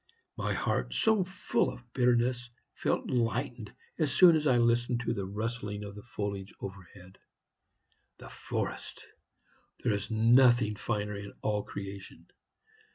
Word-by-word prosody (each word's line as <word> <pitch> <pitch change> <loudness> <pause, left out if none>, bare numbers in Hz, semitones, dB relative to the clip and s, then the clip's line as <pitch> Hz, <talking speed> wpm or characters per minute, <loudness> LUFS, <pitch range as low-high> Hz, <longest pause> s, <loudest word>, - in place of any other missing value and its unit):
My - - -1
heart, - - -1
so 220 -3 +3
full 190 +1 0
of 125 -1 -14
bitterness, 120 0 +2 0.2
felt - - -1
lightened 120 -1 -1 0.3
as 155 -4 +1
soon 175 -3 +7
as 155 -1 +1
I 125 -3 +4
listened 120 0 +2
to - - +1
the 100 -4 -3
rustling 105 0 -4
of 100 -1 -7
the 105 - -9
foliage 100 -4 -5
overhead. 95 -1 -10 1.0
The - - -11
forest! - - -5 0.8
There - - +2
is 100 0 -3
nothing 120 0 +5
finer 105 -1 -2
in 100 0 -7
all 105 -1 +1
creation. 100 -1 -8
115 Hz, 135 wpm, -30 LUFS, 100-125 Hz, 1.0 s, soon